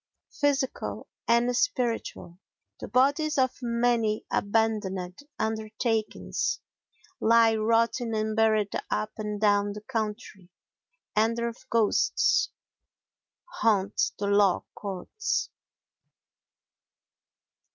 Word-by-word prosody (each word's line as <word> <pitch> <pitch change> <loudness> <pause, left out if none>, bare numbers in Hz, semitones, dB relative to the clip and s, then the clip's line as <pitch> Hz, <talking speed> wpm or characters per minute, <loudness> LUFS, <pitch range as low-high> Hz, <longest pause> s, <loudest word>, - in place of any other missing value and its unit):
Physical 280 -2 -1 0.2
and 240 +1 +3
Spiritual 240 - -1 0.4
The - - -6
bodies 285 +4 +2
of 260 -1 +1
many 235 -2 +1
abandoned 200 -4 0 0.2
undertakings 220 0 -2 0.6
lie 230 0 +5
rotting 230 +1 +1
unburied 215 -1 +1 0.2
up 215 0 -1
and 210 -1 -4
down 205 -1 +2
the 210 - -8
country 215 -5 -5 0.7
and 225 +2 +2
their 235 0 -1 0.2
ghosts 225 -3 +2 1.0
haunt 210 - +1
the 205 - -3
law 200 -2 +3
courts. 205 - -3
220 Hz, 80 wpm, -27 LUFS, 210-235 Hz, 1.0 s, lie